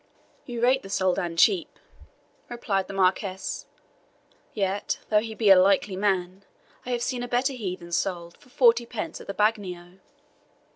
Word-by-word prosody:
"You 240 Hz, -2 st, -5 dB
rate 260 Hz, +2 st, +4 dB
the 195 Hz, -, -11 dB
Soldan 185 Hz, -3 st, -1 dB
cheap," 185 Hz, 0 st, +3 dB, 0.7 s
replied 200 Hz, -5 st, -2 dB
the -, -, -8 dB
Marquis; 190 Hz, 0 st, -1 dB, 0.8 s
"yet 200 Hz, -1 st, -2 dB
though 210 Hz, -, +4 dB
he 220 Hz, 0 st, -6 dB
be 215 Hz, -3 st, +4 dB
a -, -, +10 dB
likely 195 Hz, 0 st, +2 dB
man, 190 Hz, -1 st, -1 dB, 0.4 s
I -, -, -4 dB
have 240 Hz, -1 st, -1 dB
seen 250 Hz, -1 st, -2 dB
a 245 Hz, -, -4 dB
better 250 Hz, +3 st, 0 dB
heathen 185 Hz, -7 st, -6 dB
sold 170 Hz, -1 st, -2 dB
for -, -, -22 dB
forty 240 Hz, -3 st, +3 dB
pence 230 Hz, -3 st, -5 dB
at -, -, -13 dB
the 200 Hz, -, -5 dB
bagnio." 190 Hz, -4 st, -1 dB
200 Hz, 155 wpm, -25 LUFS, 185-235 Hz, 0.8 s, a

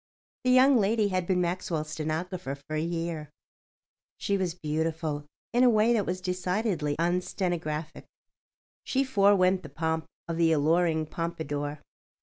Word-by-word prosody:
The 255 Hz, -, +1 dB
young 255 Hz, +1 st, +6 dB
lady 210 Hz, 0 st, +2 dB
had 185 Hz, -2 st, -1 dB
been 180 Hz, -2 st, +2 dB
Maxwell's 170 Hz, -3 st, -2 dB
stenographer 160 Hz, -1 st, -3 dB
for 145 Hz, +2 st, -7 dB
a 155 Hz, -, 0 dB
year. 165 Hz, -2 st, -3 dB, 0.9 s
She 200 Hz, -, 0 dB
was 185 Hz, -3 st, -1 dB
beautiful 155 Hz, -2 st, -2 dB, 0.3 s
in 245 Hz, +1 st, +4 dB
a 250 Hz, -, +7 dB
way 225 Hz, +1 st, +4 dB
that 210 Hz, -4 st, +1 dB
was 185 Hz, +1 st, -2 dB
decidedly 180 Hz, -3 st, -1 dB
unstenographic. 170 Hz, -2 st, -2 dB, 0.8 s
She 270 Hz, 0 st, +1 dB
forewent 195 Hz, -6 st, +4 dB
the 150 Hz, -, -10 dB
pomp 160 Hz, +2 st, -2 dB, 0.2 s
of 165 Hz, -1 st, -3 dB
the 165 Hz, -1 st, +4 dB
alluring 160 Hz, +1 st, +2 dB
pompadour. 150 Hz, -3 st, -4 dB
170 Hz, 135 wpm, -28 LUFS, 155-190 Hz, 0.9 s, a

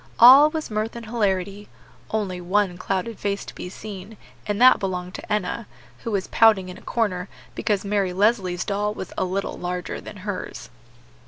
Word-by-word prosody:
All 270 Hz, +6 st, +9 dB
was 315 Hz, -5 st, -4 dB
mirth 215 Hz, +2 st, -2 dB
and 235 Hz, -1 st, -7 dB
hilarity; 205 Hz, -3 st, -1 dB, 0.4 s
only 195 Hz, -5 st, -2 dB
one 190 Hz, +1 st, +1 dB
clouded 195 Hz, +5 st, -3 dB
face 200 Hz, -1 st, -2 dB
to -, -, -9 dB
be 180 Hz, -, -7 dB
seen, 205 Hz, +1 st, -9 dB, 0.3 s
and 205 Hz, 0 st, -1 dB
that 255 Hz, +1 st, +7 dB
belonged 180 Hz, -2 st, -3 dB
to -, -, -9 dB
Enna, 210 Hz, +2 st, -1 dB, 0.3 s
who -, -, -5 dB
was 200 Hz, -3 st, -1 dB
pouting 210 Hz, -5 st, +4 dB
in 180 Hz, -, -8 dB
a -, -, -19 dB
corner 200 Hz, -5 st, -1 dB, 0.2 s
because 210 Hz, -3 st, -1 dB
Mary 200 Hz, -2 st, +1 dB
Leslie's 185 Hz, -2 st, +1 dB
doll 210 Hz, +1 st, -1 dB
was 190 Hz, -, -7 dB
a -, -, 0 dB
little 190 Hz, +2 st, -3 dB
larger 180 Hz, 0 st, -4 dB
than 210 Hz, -, -10 dB
hers. 205 Hz, -3 st, -5 dB
200 Hz, 175 wpm, -23 LUFS, 185-220 Hz, 0.4 s, All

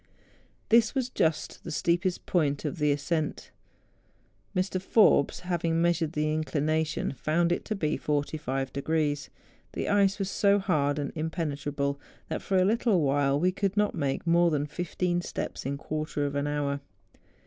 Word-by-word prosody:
This 230 Hz, +1 st, +4 dB
was 255 Hz, -2 st, -1 dB
just 160 Hz, -7 st, -1 dB
the -, -, -6 dB
steepest 175 Hz, +4 st, 0 dB
point 145 Hz, -5 st, 0 dB
of 180 Hz, -, -3 dB
the 150 Hz, -1 st, +3 dB
ascent. 150 Hz, +2 st, -2 dB, 1.0 s
Mr. 185 Hz, 0 st, 0 dB
P^'orbes, 200 Hz, -10 st, +4 dB
having 170 Hz, -2 st, 0 dB
measured 170 Hz, -2 st, +1 dB
the 155 Hz, 0 st, 0 dB
inclination, 155 Hz, +1 st, 0 dB
found 165 Hz, +6 st, +1 dB
it 175 Hz, -, 0 dB
to 215 Hz, -, -2 dB
be 155 Hz, -6 st, -1 dB
45°. 145 Hz, 0 st, -1 dB, 0.4 s
The -, -, -2 dB
ice 200 Hz, -1 st, +3 dB
was 195 Hz, -2 st, -2 dB
so 200 Hz, -1 st, +3 dB
hard 150 Hz, -7 st, +1 dB
and 145 Hz, -2 st, -2 dB
impenetrable 145 Hz, -3 st, -2 dB, 0.3 s
that -, -, -3 dB
for 190 Hz, -, 0 dB
a 185 Hz, -, +4 dB
little 215 Hz, -3 st, +2 dB
while 140 Hz, 0 st, +2 dB
we 180 Hz, +3 st, +3 dB
could 195 Hz, +1 st, -2 dB
not 210 Hz, 0 st, +2 dB
make 140 Hz, -3 st, -2 dB
more 170 Hz, 0 st, +4 dB
than 145 Hz, -2 st, 0 dB
fifteen 175 Hz, +2 st, -2 dB
steps 175 Hz, -, -5 dB
in 140 Hz, -, -1 dB
a -, -, -7 dB
quarter 155 Hz, 0 st, -3 dB
of 140 Hz, -, -2 dB
an 140 Hz, 0 st, -1 dB
hour. 145 Hz, -1 st, -1 dB
155 Hz, 160 wpm, -28 LUFS, 145-180 Hz, 1.0 s, This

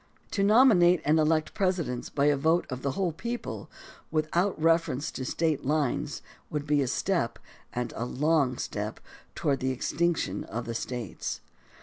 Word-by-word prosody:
To 200 Hz, -, 0 dB
nomi 225 Hz, +4 st, +6 dB
nate 175 Hz, 0 st, +5 dB
and 155 Hz, +2 st, +4 dB
elect 155 Hz, 0 st, +2 dB
Presidents 175 Hz, -10 st, -1 dB
by 140 Hz, -1 st, +1 dB
a 145 Hz, 0 st, +5 dB
vote 160 Hz, +5 st, +2 dB
of 130 Hz, 0 st, -4 dB
the 140 Hz, 0 st, -1 dB
whole 185 Hz, 0 st, 0 dB
peo 235 Hz, +9 st, -3 dB
ple, -, -, -7 dB, 0.4 s
without 160 Hz, +4 st, 0 dB
reference 165 Hz, -3 st, +2 dB
to 130 Hz, -, -5 dB
State 155 Hz, +2 st, 0 dB
lines, 145 Hz, -1 st, -1 dB, 0.3 s
would 150 Hz, -1 st, -3 dB
be 145 Hz, -1 st, +2 dB
a 135 Hz, -, 0 dB
step, 125 Hz, -, 0 dB, 0.3 s
and 125 Hz, -1 st, -3 dB
a 115 Hz, -, -2 dB
long 140 Hz, -1 st, +1 dB
step, -, -, -4 dB, 0.4 s
toward 140 Hz, -2 st, 0 dB
the 130 Hz, -, 0 dB
extinction 150 Hz, -, 0 dB
of 115 Hz, +3 st, -5 dB
the 115 Hz, -, -4 dB
States. 120 Hz, -3 st, -4 dB
155 Hz, 165 wpm, -28 LUFS, 130-170 Hz, 0.4 s, nomi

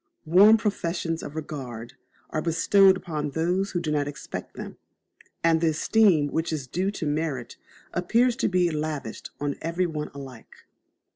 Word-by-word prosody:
Warm 200 Hz, +7 st, +7 dB
professions 170 Hz, -6 st, -2 dB
of 145 Hz, -, -8 dB
regard 130 Hz, -7 st, -6 dB, 0.4 s
are 155 Hz, -, -1 dB
bestowed 190 Hz, +4 st, +4 dB
on 150 Hz, -3 st, -2 dB
those 175 Hz, +6 st, 0 dB
who 180 Hz, -, -2 dB
do 160 Hz, -3 st, -3 dB
not 145 Hz, -1 st, 0 dB
expect 145 Hz, -, -7 dB
them, -, -, -8 dB, 0.7 s
and 165 Hz, -1 st, +3 dB
the 165 Hz, -, +3 dB
esteem 160 Hz, -1 st, +3 dB
which 160 Hz, +3 st, -1 dB
is 150 Hz, -4 st, -3 dB
due 185 Hz, +9 st, -1 dB
to 200 Hz, -5 st, -4 dB
merit 145 Hz, -5 st, -2 dB, 0.4 s
appears 230 Hz, +8 st, +2 dB
to -, -, +1 dB
be 180 Hz, -2 st, +2 dB
lavished 150 Hz, -6 st, -4 dB
on 145 Hz, -1 st, -2 dB
every 170 Hz, +3 st, 0 dB
one 155 Hz, -3 st, -4 dB
alike. 130 Hz, -4 st, -11 dB
160 Hz, 155 wpm, -26 LUFS, 145-180 Hz, 0.7 s, Warm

